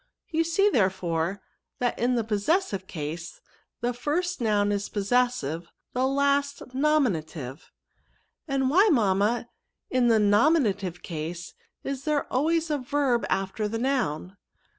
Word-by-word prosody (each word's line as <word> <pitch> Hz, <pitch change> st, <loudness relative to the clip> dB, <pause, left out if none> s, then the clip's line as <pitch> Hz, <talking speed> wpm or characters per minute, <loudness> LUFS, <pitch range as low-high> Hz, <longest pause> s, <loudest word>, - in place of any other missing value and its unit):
You 325 Hz, 0 st, +2 dB
see, 335 Hz, +5 st, +2 dB
therefore, 185 Hz, -, 0 dB, 0.3 s
that 245 Hz, -1 st, -1 dB
in 245 Hz, +2 st, +2 dB
the 235 Hz, -, +1 dB
posses* 220 Hz, -, +1 dB
sive 190 Hz, -2 st, -6 dB
case, 160 Hz, +1 st, -6 dB, 0.4 s
the 245 Hz, +1 st, 0 dB
first 335 Hz, +7 st, -2 dB
noun 205 Hz, -2 st, +2 dB
is 200 Hz, 0 st, -2 dB
possessive; 205 Hz, -, 0 dB, 0.3 s
the 255 Hz, +1 st, +1 dB
last, 280 Hz, -1 st, 0 dB
nominative." 175 Hz, -, 0 dB, 0.4 s
" -, -, -43 dB
And 270 Hz, -2 st, +1 dB
why, 390 Hz, +7 st, +5 dB
mamma, 220 Hz, -1 st, +2 dB, 0.4 s
in 255 Hz, -2 st, +3 dB
the 230 Hz, -1 st, +5 dB
nominative 205 Hz, -, +2 dB
case, 170 Hz, +2 st, -5 dB, 0.3 s
is 275 Hz, -1 st, -4 dB
there 300 Hz, -2 st, +1 dB
always 320 Hz, +4 st, +1 dB
a 295 Hz, -, +1 dB
verb 265 Hz, -2 st, 0 dB
after 195 Hz, +2 st, -1 dB
the 225 Hz, +2 st, -3 dB
noun?" 215 Hz, -, -1 dB
240 Hz, 135 wpm, -26 LUFS, 190-280 Hz, 0.4 s, why